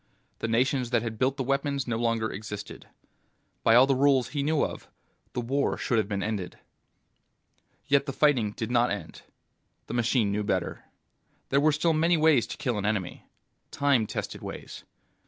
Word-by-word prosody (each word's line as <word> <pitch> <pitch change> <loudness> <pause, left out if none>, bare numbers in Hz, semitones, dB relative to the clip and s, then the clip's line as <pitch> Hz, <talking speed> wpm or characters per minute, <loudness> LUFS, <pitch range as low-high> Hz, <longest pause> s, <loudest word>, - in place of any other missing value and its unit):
The - - -2
nations 125 +2 +1
that 120 -2 +1
had 110 -2 -5
built 130 +2 +1
the 135 - -1
weapons 140 0 -1
no 115 -2 -1
longer 115 -2 0
existed. 105 0 -8 0.7
By 115 - +4
all 125 +2 +8
the 135 - +2
rules 135 -1 +3
he 145 - -2
knew 150 +1 +1
of, - - -7 0.5
the 125 - -2
war 135 +4 0
should 120 - 0
have 105 - -1
been 100 -1 -2
ended. 105 -5 -4 1.3
Yet 140 +1 +2
the - - -1
fighting 130 -7 +2
did 110 +2 -4
not 120 0 +3
end. 105 - -6 0.6
The - - -7
machine 120 -3 +1
knew 105 +1 -1
better. - - -2 0.6
There 140 +1 +3
were 155 +1 +4
still 160 +3 +1
many 165 +2 +3
ways 155 -6 +4
to - - -7
kill 120 -5 -1
an 100 - -3
enemy. 100 -4 -3 0.4
Time 140 -6 +2
tested - - -5
ways. - - -8
125 Hz, 175 wpm, -27 LUFS, 110-140 Hz, 1.3 s, all